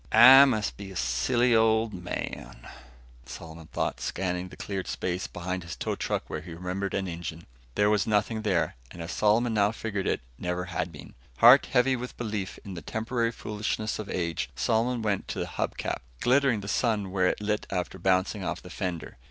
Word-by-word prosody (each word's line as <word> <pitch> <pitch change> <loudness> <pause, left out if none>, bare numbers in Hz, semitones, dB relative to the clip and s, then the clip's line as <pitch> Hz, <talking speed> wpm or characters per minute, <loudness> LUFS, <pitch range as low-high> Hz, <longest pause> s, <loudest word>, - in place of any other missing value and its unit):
"I 130 +5 +10
must 110 -6 0
be 100 -1 -8
a 95 - -10
silly 85 - +2
old 110 -1 +3
man," 90 -8 -6 0.6
Solomon 80 -1 -9
thought, - - -2
scanning 90 -1 -2
the - - -13
cleared 95 -2 -4
space 90 0 -2
behind 90 +1 -4
his 85 - -7
tow - - -2
truck - - -2
where - - -5
he 85 - -9
remembered 90 +3 -3
an 95 -1 -1
engine. 85 -1 -6 0.3
There 105 - +3
was 105 -1 +2
nothing 110 +1 +1
there, 95 -6 0
and 90 - -12
as 85 0 -5
Solomon 110 +3 +2
now 105 -1 +3
figured 110 -3 -3
it, - - 0 0.2
never 90 0 -2
had 85 -2 -3
been. 75 - -12 0.2
Heart 125 - +8
heavy 130 +1 +3
with 125 0 -6
belief 105 -5 -3
in 100 - -6
the 85 - -6
temporary 115 +6 -1
foolishness 110 -1 -3
of 105 - -6
age, 85 -7 -2
Solomon 115 - +1
went 100 -3 -1
to - - -4
the - - -1
hub - - -3
cap, - - -3 0.2
glittering 130 -3 +3
the 100 - -8
sun 105 -3 0
where 95 -1 +2
it - - 0
lit 105 0 -1
after 95 0 -3
bouncing 95 +2 +1
off 85 -1 -2
the 90 - -12
fender. 90 -5 -4
100 Hz, 195 wpm, -28 LUFS, 90-110 Hz, 0.6 s, I